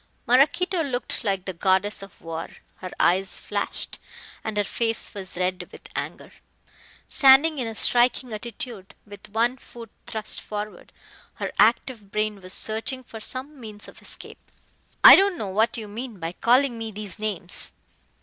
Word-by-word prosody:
Maraquito 310 +9 +3
looked 260 -3 -3
like 195 -4 -1
the 190 - -4
goddess 190 +4 +1
of 195 -1 -12
war. 165 0 -6 0.3
Her 185 - -7
eyes 190 +3 +2
flashed - - -2 0.4
and 220 -1 -4
her 205 - +3
face 225 +2 -1
was 190 -4 -6
red 185 0 -2
with - - -13
anger. - - -5 0.8
Standing 280 +3 +6
in 245 - -2
a 225 - -6
striking 245 +1 +3
attitude, 215 -2 -7
with 205 0 -12
one 235 +4 +1
foot 235 -2 -12 0.2
thrust 215 -1 -3
forward, 210 0 -7 0.4
her - - -4
active 225 0 +2
brain 215 -1 -1
was 185 0 -7
searching 225 +4 -2
for 225 -2 -10
some 265 +6 -6
means 215 -3 -8
of - - -14
escape. - - -9 0.5
"I - - +13
don't 390 -2 +3
know 205 - -4
what 220 +5 +1
you 220 -2 -6
mean 225 0 -7
by 165 0 -3
calling 245 +5 +2
me 225 0 -4
these 210 -1 -4
names!" 195 -5 0
220 Hz, 160 wpm, -24 LUFS, 200-245 Hz, 0.8 s, I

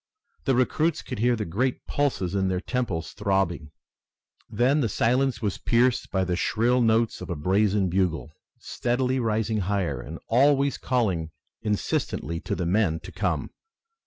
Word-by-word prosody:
The 135 - +3
recruits 155 +6 +1
could 125 - -6
hear 120 +2 +3
the 105 -2 -3
great 120 +10 -1
pulses 110 -11 -1
in 95 -1 +1
their 95 -1 0
temples 100 -7 -3
throbbing. 95 -7 0 0.8
Then 135 +5 +2
the 115 - 0
silence 125 +5 +1
was 100 -3 -1
pierced 120 +1 +2
by 95 -1 0
the 90 -1 -1
shrill 120 +6 +1
notes 115 0 +2
of - - -7
a 85 - -2
brazen 95 +5 +2
bugle, 85 -4 0 0.3
steadily 125 +2 -1
rising 110 -1 0
higher 90 -9 -1
and 80 +6 -8
always 140 +3 +3
calling 95 -11 0 0.3
insistently 85 -5 -2
to - - -3
the 90 - -2
men 90 -3 +1
to - - -10
come. - - -2
105 Hz, 155 wpm, -26 LUFS, 90-125 Hz, 0.8 s, The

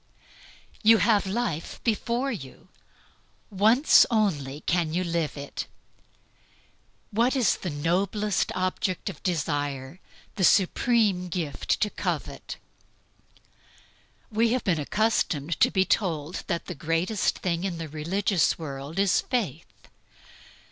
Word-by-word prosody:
You 225 +1 +7
have 210 -3 +3
life 190 -6 -3
before 235 +4 0
you. 135 - -9 0.8
Once 220 +9 +6
only 180 - 0
you 150 - -11
can 170 -2 0
live 170 -4 -1
it. 140 0 -6 1.4
What 235 +6 +2
is 245 -6 +2
the 180 - -4
noblest 190 +7 0
object 185 +1 -1
of 155 - -15
desire, 145 -3 -2 0.4
the 190 - 0
supreme 200 0 +3
gift 160 -7 -2
to 210 - +1
covet? - - -4 1.7
We 225 +2 +2
have 255 - -1
been 170 -5 +1
accustomed 165 -4 0
to - - +5
be 190 -2 +2
told 165 -5 -1
that 170 -3 -2
the - - -5
greatest 165 +7 0
thing 170 -1 -2
in 185 -3 -2
the 165 -1 -5
religious 170 +4 0
world 140 0 -7
is 195 -2 +3
Faith. 230 - -4
185 Hz, 115 wpm, -26 LUFS, 155-210 Hz, 1.7 s, You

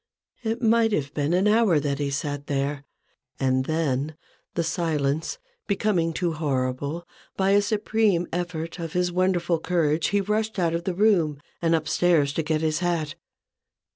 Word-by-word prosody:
It 230 +2 -2
might 225 -1 +4
have 140 -5 -1
been 145 0 0
an 185 +4 +3
hour 210 -7 +4
that 140 -1 -2
he 145 -1 -1
sat 145 0 -3
there; 140 0 -2 0.5
and 130 0 +1
then, 155 -2 -1 0.4
the 170 - +1
silence 160 - -1 0.3
becoming 195 -5 +1
too 170 0 -1
horrible, 145 +2 -2 0.3
by 195 0 +2
a 205 +1 +5
supreme 205 -3 +1
effort 170 -1 -3
of 165 -2 -5
his 180 0 +1
wonderful 175 -2 +1
courage 160 -2 +1
he 205 - +1
rushed 215 +2 -1
out 170 -3 +1
of 170 +1 -2
the 185 - -1
room 175 -8 +3 0.2
and 165 -1 +3
up 160 -1 -2
stairs 155 -6 +3
to 165 - 0
get 155 0 -1
his 155 -1 0
hat. 170 -4 -1
165 Hz, 165 wpm, -25 LUFS, 150-185 Hz, 0.5 s, a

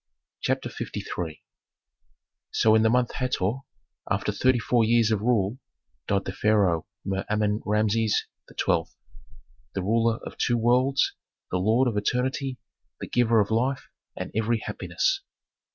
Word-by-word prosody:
CHAPTER - - -1 0.5
LIII 80 -3 -5 1.1
So 110 - +3
in 110 - +5
the 110 - +4
month 125 0 +2
Hator, 125 -4 -1 0.5
after - - 0
thirty 130 -1 +3
four 120 +1 +2
years 115 0 +3
of 105 -2 +1
rule, 115 0 +1 0.5
died 100 -1 +1
the - - -3
Pharaoh 95 -5 +2 0.2
Mer 95 0 -1
Amen 105 0 +1
Rameses 105 +1 +2 0.2
XII., - - 0 0.9
the 95 - -1
ruler 115 +2 +2
of - - -8
two 120 - +2
worlds, 125 +4 +2 0.4
the 90 - 0
lord 110 +7 +3
of 115 -4 -1
eternity, 130 +4 -1 0.4
the - - -6
giver 120 -2 +3
of 100 - -2
life 130 +4 0 0.3
and - - -5
every 110 +2 +1
happiness. 385 0 -1
110 Hz, 135 wpm, -26 LUFS, 105-125 Hz, 1.1 s, in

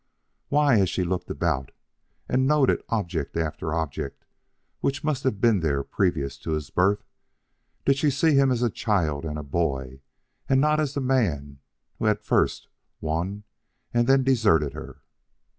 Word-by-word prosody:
Why, 145 -6 +4
as 95 -3 +2
she 90 - -1
looked 90 0 -3
about, 65 0 -1 0.6
and 130 +1 +2
noted 145 -3 +3
object 85 -10 -2
after 80 -1 -2
object 75 -4 -4 0.5
which 140 +2 -1
must 150 -3 -1
have 110 -6 0
been 115 -3 +4
there 70 -4 0
previous 70 0 -1
to 80 - -3
his 75 -1 -4
birth, 100 +3 +2 0.8
did 135 0 +3
she 150 - +3
see 150 +3 +2
him 135 -1 +4
as 125 -1 0
a 120 - +2
child 80 -11 0
and 75 -2 -5
boy 70 -6 -2 0.5
and 135 - +4
not 150 +2 +3
as 145 -3 -1
the 140 - -1
man 80 - 0 0.4
who - - -2
had 105 -1 +2
first - - +1 0.3
won 85 +6 -3 0.5
and 120 0 +2
then 135 0 +5
deserted 105 - +3
her? - - -10
100 Hz, 160 wpm, -25 LUFS, -, 0.8 s, then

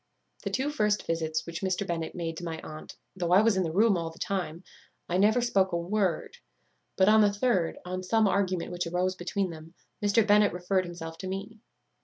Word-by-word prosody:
"The - - -3
two 275 +3 -1
first 210 -8 +1
visits 160 -2 -1
which 170 -1 -6
Mr. 190 +1 -1
Bennet 165 -3 -3
made 165 -2 -3
to 175 - -7
my 165 -2 -4
aunt, 155 0 -9 0.2
though 175 -2 -2
I 190 +4 +6
was 225 -2 +3
in 190 - +2
the 165 -3 -1
room 205 +4 +4
all 165 -2 -2
the 165 - -15
time, 180 -3 -3 0.4
I 175 - 0
never 215 +5 +4
spoke 195 -6 +2
a - - +2
word; 190 - -1 0.6
but 190 - +4
on 215 +1 +6
the 205 -1 +4
third, 200 -5 0
on 185 +1 -3
some 215 +3 +2
argument 185 -3 0
which 175 -1 -3
arose 180 +2 0
between 185 +1 -2
them, 160 +1 -11 0.3
Mr. 205 +1 +4
Bennet 210 -1 +4
referred 180 +1 0
himself 165 -2 -8
to 190 - -5
me. 200 +4 -6
185 Hz, 210 wpm, -28 LUFS, 170-205 Hz, 0.6 s, I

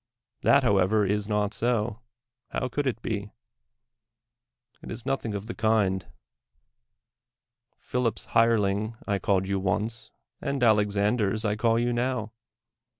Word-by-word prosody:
That, 140 0 +5
however, 100 -1 +3
is 105 +2 -1
not 105 0 0
so 115 0 0 0.3
— 125 0 -59
how 130 - -1
could 145 +3 -1
it 115 -2 -2
be? 100 -2 -3 1.5
It - - -10
is 120 - -6
nothing 130 -6 -2
of 100 0 -4
the 115 - -5
kind. 105 -4 +1 1.7
Phil 125 -1 -1
ip 110 - -2
's - - -7
hireling 110 -1 +2
I 100 -2 0
called 95 0 +1
you 100 0 0
once, 110 +6 -2 0.3
and 140 -2 -1
Alexander's 105 0 +2
I 105 0 +1
call 115 +1 +2
you 120 +1 +1
now. 120 -2 -1
110 Hz, 140 wpm, -27 LUFS, 100-120 Hz, 1.7 s, That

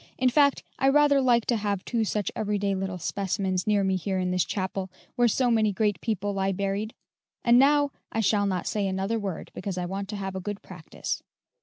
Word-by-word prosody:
"In 255 0 +3
fact, 280 0 +3 0.2
I 270 - +4
rather 285 0 +5
like 240 -3 +3
to 240 - +1
have 205 -3 -2
two 230 -2 0
such 210 -2 -1
every 210 -1 -1
day 200 0 0
little 190 -1 -3
specimens 190 +1 -2
near 205 -2 +3
me 190 -1 +1
here 190 +1 -2
in 180 -1 0
this 180 -1 +2
chapel, 190 -1 -3 0.3
where 240 0 +4
so 245 +2 +2
many 220 -2 +3
great 205 -2 0
people 205 -3 -1
lie 195 0 0
buried; 200 +3 -2 0.5
and 240 0 +6
now 285 +1 +4 0.2
I 225 - -2
shall 205 -1 +2
not 185 -3 -1
say 205 -2 0
another 195 +4 -1
word, 195 -5 -5
because 185 -1 -5
I 180 - -1
want 195 +2 -4
to 210 - -4
have 195 -1 -4
a - - -2
good 205 +1 -5
practice." - - -5
205 Hz, 215 wpm, -27 LUFS, 190-225 Hz, 0.5 s, and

